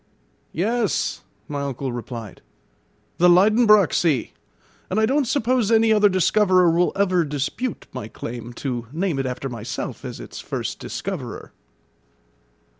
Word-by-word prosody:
"Yes," 220 +4 0 0.3
my 145 -2 -4
uncle 135 -1 -3
replied, 120 -3 -7 0.8
"the 180 +1 +6
Liedenbrock 210 +1 +5
Sea; 155 -8 +1 0.6
and 190 - 0
I 220 - +4
don't 275 +2 +1
suppose 245 -3 +1
any 225 0 +5
other 210 -1 +5
discoverer 185 -1 +3
will 175 +2 +2
ever 185 -3 +2
dispute 150 - -3
my 105 - -5
claim 120 +1 -7
to 120 -2 -4
name 165 -2 -1
it 135 - -1
after 130 +2 -4
myself 120 -1 -6
as - - -7
its - - -9
first - - -4
discoverer." - - -6
180 Hz, 130 wpm, -22 LUFS, 135-215 Hz, 0.8 s, the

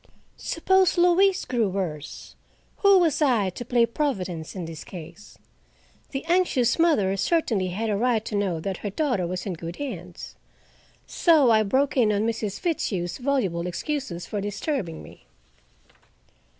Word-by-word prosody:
Suppose 375 +2 +2
Louise 365 +2 +4
grew 235 -5 0
worse? 170 -6 -5 0.4
Who 400 -1 +6
was 335 -4 +2
I 230 -10 +2
to 245 - -7
play 240 -1 +3
Providence 190 - -3
in 180 -3 -4
this 165 -2 -8
case? 170 +3 -11 0.7
The 270 - -5
anxious 335 -8 +2
mother 250 - +3
certainly 215 - +1
had 205 +5 -3
a 210 - 0
right 225 0 +1
to - - -6
know 195 -5 0
that 190 +1 -3
her 205 - -4
daughter 215 - -1
was 180 +1 -4
in 195 - -3
good 170 +1 -7
hands. 180 -11 -7 0.7
So 305 -8 +4
I 220 -1 +5
broke 265 +7 +1
in 225 -4 +4
on 210 +1 0
Mrs. 220 -3 -2
Fitzhugh's 200 - -2
voluble 230 -11 0
excuses 185 - -4
for 205 - -4
disturbing 205 - -3
me. - - -15
220 Hz, 150 wpm, -25 LUFS, 185-285 Hz, 0.7 s, Who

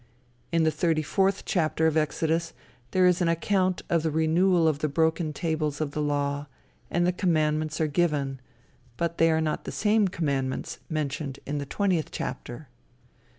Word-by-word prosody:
In 165 -1 +3
the 160 - +3
thirty 155 0 +1
fourth 195 +5 +1
chapter 160 -2 +1
of 160 -1 +2
Exodus, 160 +2 0 0.4
there 185 +5 +3
is 180 0 +3
an 175 - +2
account 185 +2 +1
of 170 -1 +2
the 160 - 0
renewal 165 +3 +3
of 150 -2 +1
the 155 - 0
broken 160 +2 +1
tables 155 -2 -2
of 155 -2 -2
the 150 - -3
law, 145 0 -1 0.4
and 175 0 +1
the 180 - +3
commandments 155 -4 0
are 160 - +2
given, 145 -4 0 0.6
but 170 +2 -2
they 165 - +5
are 160 0 +2
not 155 -1 -2
the - - -4
same 210 -1 +2
commandments 140 -7 -2
mentioned 145 -2 -3
in 145 +1 -2
the 140 - -5
twentieth 185 -2 0
chapter. 125 +5 -6
160 Hz, 170 wpm, -27 LUFS, 150-170 Hz, 0.6 s, they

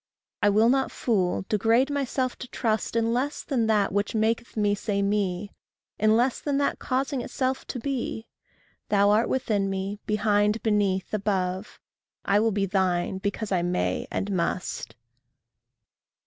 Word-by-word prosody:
I 205 - +5
will 215 +3 +4
not 265 +1 +2
fool, 190 -5 0
degrade 230 +6 +2
myself 265 -2 -1
to 255 - -7
trust 225 -2 -1
In 230 0 +2
less 275 +5 -1
than 240 -6 0
that 210 -3 +2
which 205 +2 0
maketh 225 +2 0
me 205 -1 +2
say 200 -1 -1
Me, 200 -1 -1 0.5
In 215 +1 +4
less 245 +2 +1
than 285 -2 -1
that 285 - 0
causing 270 +1 -1
itself 260 +2 -2
to - - -4
be. 240 -3 -3 0.6
Then 200 -1 +3
art 210 +3 +3
within 210 -6 0
me, 195 +1 -3
behind, 210 0 +2
beneath, 205 -3 +1
above 190 -2 -2 0.5
I 200 +1 +3
will 225 +1 +3
be 200 -1 0
thine 190 -1 0
because 200 +2 -3
I 180 -2 +2
may 90 - -1
and 200 - -2
must. 170 - -2
210 Hz, 150 wpm, -26 LUFS, 195-235 Hz, 0.6 s, I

